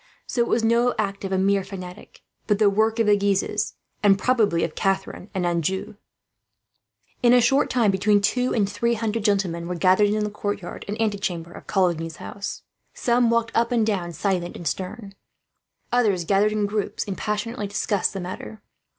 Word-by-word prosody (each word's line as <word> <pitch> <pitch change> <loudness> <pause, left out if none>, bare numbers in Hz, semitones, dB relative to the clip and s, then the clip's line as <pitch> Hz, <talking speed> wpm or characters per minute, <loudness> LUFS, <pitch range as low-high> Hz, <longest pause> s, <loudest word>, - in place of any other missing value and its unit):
So 240 - -1
it 235 - +1
was 230 - +1
no 235 +2 +3
act 200 -2 -2
of 195 - -4
a 190 - +1
mere 195 +1 +2
fanatic, 185 -2 -10 0.3
but 210 - +2
the 205 -1 +4
work 220 +2 +2
of 230 - +2
the 210 0 +5
Guises, 200 +1 0 0.3
and 200 -2 +5
probably 210 -8 +2
of 155 - -2
Catharine 195 0 -2
and 185 -2 0
Anjou. 175 +3 -1 1.3
In 245 -1 +5
a 250 - +7
short 270 +4 +3
time 230 -5 +3
between 205 +2 +3
two 250 +5 +1
and 205 -4 +2
three 235 +3 0
hundred 225 -1 -2
gentlemen 190 -5 0
were 180 - -3
gathered 185 +4 +4
in 210 +1 0
the 210 - -2
courtyard 205 -3 -5
and 210 +2 -4
antechamber 195 -6 -2
of - - -12
Coligny's 170 -4 0
house. 200 +3 -7 0.3
Some 240 -1 +2
walked 230 -1 +1
up 230 +1 +1
and 230 -3 +2
down, 190 -5 -1
silent 180 -1 -2
and 170 - -6
stern. 195 +2 -4 0.8
Others 210 -8 +2
gathered 200 +3 +3
in 210 -1 +1
groups, 205 0 -2
and 200 -3 -4
passionately 210 +1 -3
discussed 200 0 0
the 195 - -4
matter. 185 +4 -7
205 Hz, 185 wpm, -24 LUFS, 190-225 Hz, 1.3 s, a